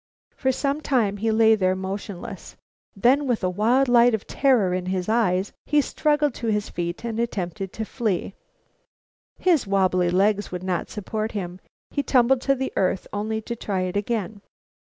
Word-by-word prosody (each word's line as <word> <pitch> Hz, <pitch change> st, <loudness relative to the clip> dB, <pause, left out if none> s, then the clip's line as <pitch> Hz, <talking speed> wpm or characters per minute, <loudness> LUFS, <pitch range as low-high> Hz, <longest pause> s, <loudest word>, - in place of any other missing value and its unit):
For 265 Hz, -, +1 dB
some 280 Hz, +3 st, -1 dB
time 225 Hz, -9 st, +1 dB
he 225 Hz, +3 st, -1 dB
lay 220 Hz, 0 st, +5 dB
there 185 Hz, -3 st, +2 dB
motionless. 190 Hz, 0 st, -6 dB, 0.4 s
Then, 260 Hz, +8 st, +3 dB
with 240 Hz, -6 st, 0 dB
a 185 Hz, -, +1 dB
wild 235 Hz, +8 st, +2 dB
light 240 Hz, -1 st, +5 dB
of 215 Hz, -, -7 dB
terror 240 Hz, -10 st, +2 dB
in 180 Hz, 0 st, -2 dB
his 185 Hz, -1 st, -2 dB
eye, 205 Hz, -5 st, +2 dB, 0.2 s
he 295 Hz, -, +3 dB
struggled 295 Hz, 0 st, +1 dB
to 235 Hz, -, -5 dB
his 210 Hz, -1 st, 0 dB
feet 175 Hz, +5 st, -4 dB
and 230 Hz, -1 st, -3 dB
attempted 195 Hz, -4 st, -3 dB
to 220 Hz, -, -4 dB
flee. 210 Hz, -5 st, -2 dB, 1.0 s
His 335 Hz, -, +2 dB
wabbly 185 Hz, -2 st, +2 dB
legs 205 Hz, +3 st, +1 dB
would 180 Hz, 0 st, -5 dB
not 185 Hz, -2 st, -2 dB
support 215 Hz, +2 st, -4 dB
him. 180 Hz, -3 st, -5 dB, 0.3 s
He 285 Hz, -, 0 dB
tumbled 255 Hz, -1 st, +3 dB
to 275 Hz, +1 st, +2 dB
the 265 Hz, 0 st, -3 dB
earth, 185 Hz, 0 st, 0 dB
only 220 Hz, +2 st, -2 dB
to 235 Hz, +2 st, -5 dB
try 195 Hz, -4 st, -2 dB
it 185 Hz, 0 st, -3 dB
again. 205 Hz, -1 st, -2 dB
215 Hz, 175 wpm, -24 LUFS, 190-245 Hz, 1.0 s, lay